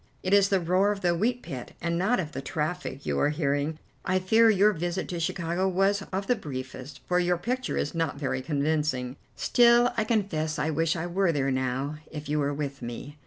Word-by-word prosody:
It 185 - 0
is 200 -1 +5
the 195 - +3
roar 185 +4 +2
of 200 -1 -4
the 175 -2 +2
wheat 235 +8 0
pit, 125 -3 -7
and 170 0 -1
not 195 +8 +2
of 155 -4 -3
the 135 - -5
traffic 155 -1 -3
you - - 0
are 145 - +3
hearing. 150 0 -1 0.3
I 185 0 +1
fear 220 +5 +4
your 210 0 +4
visit 175 +2 -3
to 175 - -3
Chicago 175 +1 -1
was 195 +2 +2
of 195 +1 -2
the 250 - +2
briefest, 130 - -7
for 180 0 +2
your 175 0 +2
picture 250 +7 -2
is 145 - -1
not 165 -3 -1
very 130 -2 -2
convincing. 145 -3 -1 0.2
Still, 240 0 +4
I 225 - +3
confess 190 -9 -1
I 150 +2 0
wish 160 +1 +1
I 170 0 -3
were 180 +1 +1
there 135 -3 0
now, 130 +3 -1
if 150 -1 -7
you 150 +1 0
were 145 0 +1
with 140 -1 -4
me." 125 +5 -7
170 Hz, 215 wpm, -27 LUFS, 145-195 Hz, 0.3 s, is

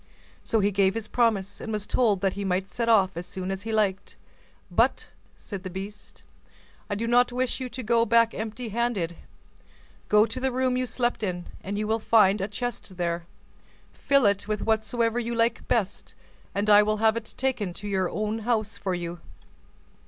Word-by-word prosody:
So 225 - +1
he 200 +1 +2
gave 195 0 +2
his 225 -2 -4
promise, 205 -5 0
and 220 - -5
was 210 -1 -2
told 210 -7 +2
that 195 -1 +1
he 200 - -4
might 185 0 0
then - - -19
set 235 -1 -1
off 195 -5 +4
as 170 +1 -5
soon 185 0 -4
as 195 0 -4
he 225 +2 -5
liked. 205 -3 0 0.6
"But," - - +2 0.3
said 200 -3 -7
the 185 - -6
beast, 195 +3 -8 0.7
"I 205 - -1
do 225 +3 -2
not 245 +1 +4
wish 255 +2 -1
you 255 -1 -4
to 250 +1 -6
go 230 +1 +3
back 230 +1 +4
empty 220 +2 -5
handed. 210 -7 -1 0.9
Go 210 +1 +6
to 255 - -5
the 265 0 0
room 255 0 +1
you 255 0 0
slept 240 +1 -1
in, 180 -4 -3
and 200 +2 -3
you 215 - -1
will 220 +1 0
find 210 -3 +4
a 195 - -1
chest 210 -3 -5
there; 170 -1 -2 0.7
fill 275 -3 +2
it 200 0 +2
with 215 -1 -2
whatsoever 230 +1 +1
you 235 0 -3
like 230 0 0
best, 210 -5 -1 0.4
and 200 +1 0
I 205 0 +8
will 215 +1 +1
have 220 +1 +3
it 230 -1 -6
taken 250 -8 -1
to 205 - -6
your 190 -3 0
own 215 +1 -2
house 220 -2 -1
for 185 -2 -1
you." 175 0 -5
215 Hz, 195 wpm, -26 LUFS, 195-230 Hz, 0.9 s, I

